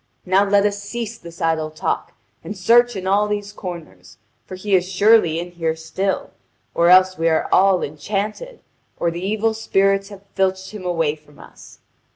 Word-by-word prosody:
Now 190 +2 +3
let 200 0 +4
us 205 0 -1
cease 230 +2 -6
this 170 -1 -12
idle 160 -1 0
talk, 155 - -3 0.3
and 210 - -7
search 240 +4 +4
in 190 -1 -5
all 200 +2 +2
these 205 0 -4
comers, 125 - -9 0.3
for 185 - -7
he 195 +2 -4
is 185 0 +2
surely 195 -4 +4
in 175 +1 -6
here 165 -2 -2
still, 185 +5 -3 0.4
or 170 +1 +3
else 185 -1 +5
we 165 0 +2
are 160 - +1
all 190 -1 +4
enchanted, 205 - -4 0.4
or 170 - 0
the 170 +2 -6
evil 215 +3 0
spirits 195 -2 +1
have 200 -1 -13
filched 190 0 -1
him 210 -4 -9
away 165 -4 0
from 150 -1 -22
us." - - -16
190 Hz, 180 wpm, -20 LUFS, 170-205 Hz, 0.4 s, else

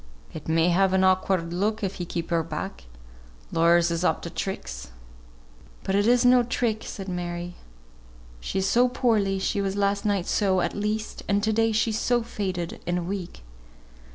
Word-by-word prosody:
"It 155 - -8
may 165 +2 +3
have 190 +2 +3
an 190 0 +3
awkward 185 -2 +2
look, 210 +4 -1
if 195 -1 -3
we 175 - -4
keep 170 -1 -4
her 165 -1 +3
back. 160 - -6 0.7
Lawyers 170 +1 +4
is 170 +1 -1
up - - +1
to 170 - -6
tricks." - - -5 0.9
"But 190 - -2
it's 235 +5 +3
no 250 0 +6
trick," 235 -2 -1
said 195 -1 -7
Mary. 175 -1 -4 0.9
"She - - -4
is 190 0 +1
so 245 +1 +4
poorly, 220 -6 +1
she 200 +1 -1
was 195 0 -2
last 200 0 +1
night, 200 -4 0 0.2
at 190 -3 +1
least; 210 +1 -3
and 200 0 +1
to 220 0 +1
day 225 +1 +2
she's 220 0 +1
so 240 -1 +1
faded 185 -6 -4
and 175 -1 -1
weak." 180 - -5
195 Hz, 170 wpm, -25 LUFS, 175-215 Hz, 0.9 s, no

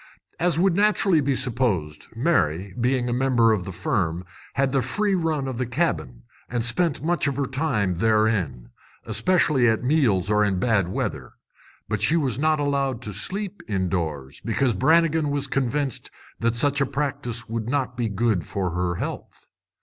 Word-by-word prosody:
As 170 -2 +1
would 185 0 +3
naturally 200 -4 +3
be 140 -1 +1
supposed, 110 - -1
Mary, 100 - +1
being 125 0 +1
a 120 - 0
member 125 -3 +3
of 100 -5 0
the 95 - -5
firm, 85 -1 -1 0.3
had 135 -1 +1
the 135 -1 +2
free 195 - 0
run 160 -6 0
of 130 -2 -4
the 130 - 0
cabin, 115 - -2 0.3
and 120 -1 -1
spent 150 +3 +1
much 170 -2 +1
of 140 -2 -2
her 140 - 0
time 125 - 0
therein, 105 - +1 0.4
especially 150 -9 +2
at 110 +1 0
meals 125 - +2
or 105 0 +4
in 100 -3 +1
bad 100 -2 +2
weather. 90 - -4 0.5
But 105 -2 -2
she 155 +11 +3
was 135 -5 -1
not 155 0 +2
allowed 140 -4 -1
to 105 - -5
sleep 195 - -4
indoors, 85 - -2
because 120 +3 +1
Brannigan 160 - +3
was 145 -1 -1
convinced 135 0 -2 0.3
that 115 0 +1
such 140 +4 +1
a 140 - +2
practice 130 -5 -3
would 115 0 -3
not 130 -2 -1
be 115 -2 -1
good 105 -2 0
for 95 -3 -3
her 90 0 -1
health. - - -6
125 Hz, 170 wpm, -24 LUFS, 100-145 Hz, 0.5 s, or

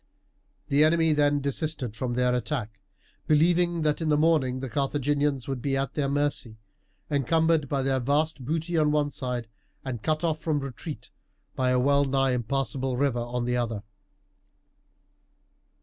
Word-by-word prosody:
The 145 +2 +4
enemy 160 0 +4
then 145 -1 +2
desisted 140 -4 -2
from 120 +1 -3
their 125 0 +2
attack, 110 -3 -3 0.5
believing 170 +2 +3
that 150 +1 +1
in 160 - 0
the 150 - +3
morning 150 -5 +2
the 135 - -4
Carthaginians 140 +1 0
would 135 -3 -3
be 135 0 0
at 135 0 -2
their 140 -2 -1
mercy, 140 -5 -1 0.5
encumbered 160 +1 +2
by 140 -2 0
their 135 0 +1
vast 145 +3 0
booty 165 +4 -1
on 150 -1 +3
one 150 -1 +1
side 125 -4 -4 0.4
and 120 -4 -4
cut 155 +4 0
off 160 -2 0
from 155 -2 0
retreat 140 +3 -7 0.4
by 130 -1 +1
a 125 - +3
well 140 +3 +3
nigh 135 -1 +1
impassable 130 +1 -1
river 135 -3 +1
on 120 0 -3
the 125 0 0
other. 115 -4 -2
140 Hz, 155 wpm, -27 LUFS, 125-155 Hz, 0.5 s, The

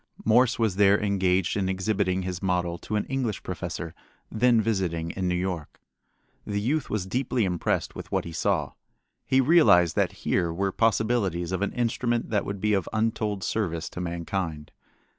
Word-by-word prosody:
Morse 120 +3 +4
was 110 -5 0
there 100 0 +5
engaged 95 -3 +1
in 95 -2 0
exhibiting 95 -1 0
his 90 -1 -4
model 90 -2 -1
to 105 - -4
an 105 - 0
English 130 -6 -2
professor 85 -2 -5 0.4
then 120 +1 +3
visiting 90 -7 -1
in 95 -1 -3
New 90 - +1
York. 90 -4 -4 0.6
The 100 -1 -2
youth 135 +8 -1
was 105 -3 -2
deeply 120 +1 0
impressed 90 -3 -1
with - - -9
what - - 0
he 85 - -6
saw. 80 - 0 0.6
He 130 - +3
realized 125 - +5
that - - +2
here 85 -3 +1
were 95 +3 -1
possibilities 105 -6 +1
of 95 0 -2
an 100 - 0
instrument 120 0 -1
that 105 -2 +1
would 100 0 -4
be 105 +2 +1
of 95 -4 0
untold 110 -2 -1
service 85 -7 -2
to 90 - -5
mankind. 85 -3 -4
95 Hz, 170 wpm, -26 LUFS, 90-110 Hz, 0.6 s, there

